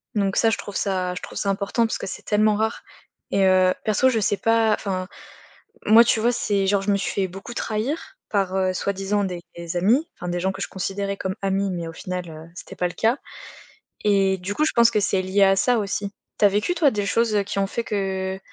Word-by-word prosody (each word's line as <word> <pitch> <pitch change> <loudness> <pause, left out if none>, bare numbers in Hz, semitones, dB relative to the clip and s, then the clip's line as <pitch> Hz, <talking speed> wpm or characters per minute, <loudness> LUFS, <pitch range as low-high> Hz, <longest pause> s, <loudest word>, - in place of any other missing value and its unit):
Donc 200 -1 +1
ça, 225 - +4
je - - 0
trouve 205 - -8
ça 185 -2 -1
je - - -6
trouve - - -8
ça 200 - -1
important 200 +4 0
parce 225 - -2
que - - -6
c'est - - -7
tellement 210 0 +3
rare 220 +1 -1 0.5
et 195 0 +2
heu, 185 -1 +4
perso 215 +5 +2
je 225 -3 +1
sais 205 +1 +1
pas, 225 -1 +3
enfin, 185 -3 -3 0.8
moi 225 +2 +8
tu 225 - +2
vois, 240 +2 +3
c'est 200 -4 0
genre 200 0 +2
je 205 +1 0
me - - +3
suis 200 - -2
fait 190 -1 0
beaucoup 195 +6 -9
trahir 260 - -3
par, 195 -2 0
heu, 185 -1 +1
soi-disant 200 +2 -1
des 180 -2 -5 0.2
des 170 0 -6
amis, 230 - +3
enfin, 175 - -6
des 175 0 -1
gens 190 +2 0
que 195 - -8
je - - -2
considérais 195 +1 -3
comme 190 +1 -3
amis, 195 0 0
mais 170 -2 -4
au - - -6
final, 180 0 -5
heu, 160 +1 -10
c'était 195 - -10
pas 180 - +1
le 175 - -8
cas 230 +5 +1 0.9
et 195 -2 +3
du 200 +3 -4
coup, 305 - +2
je - - +1
pense 235 0 +6
que 215 - +2
c'est 195 -2 +1
lié 190 +2 +2
à 195 0 +5
ça 245 +4 +2
aussi. 200 -1 -2 0.3
Tu 205 - +5
as - - +7
vécu, 210 - 0
toi, 325 -5 +4
des 205 -1 -2
choses, 230 +1 +1
heu, 200 - +2
qui 200 0 -3
ont 195 - +1
fait 235 - -3
que 190 -2 -2
200 Hz, 245 wpm, -23 LUFS, 190-215 Hz, 0.9 s, moi